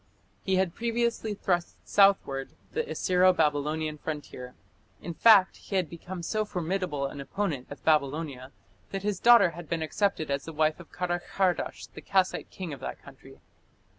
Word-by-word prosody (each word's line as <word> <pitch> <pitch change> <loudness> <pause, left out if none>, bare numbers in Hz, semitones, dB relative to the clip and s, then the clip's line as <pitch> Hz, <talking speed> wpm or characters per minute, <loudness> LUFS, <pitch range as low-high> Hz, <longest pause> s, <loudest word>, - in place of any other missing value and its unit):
He 190 - 0
had 185 -2 +1
previously 235 -1 -1
thrust 175 -3 -1
southward 195 -10 +3 0.2
the 470 - 0
Assyro 185 0 +3
Babylonian 155 -1 0
frontier. 145 -5 -6 0.4
In 170 - -6
fact, 200 0 +6
he 195 - -7
had 180 -5 0
become 175 +1 -7
so 215 +5 0
formidable 180 -6 -2
an 140 0 -5
opponent 155 -4 -3
of 145 - -11
Babylonia 140 -3 0 0.4
that 195 0 -4
his 205 -3 -1
daughter 235 -7 +7
had 170 -1 -10
been 165 -1 -1
accepted 160 -2 -1
as 140 0 -2
the 165 - -7
wife 155 +1 +1
of 175 - -13
Karakhardash, 180 +1 -1
the - - -9
Kassite 190 -1 0
king 180 -5 -6
of 140 - -8
that - - -6
country. - - -15
175 Hz, 160 wpm, -28 LUFS, 150-195 Hz, 0.4 s, daughter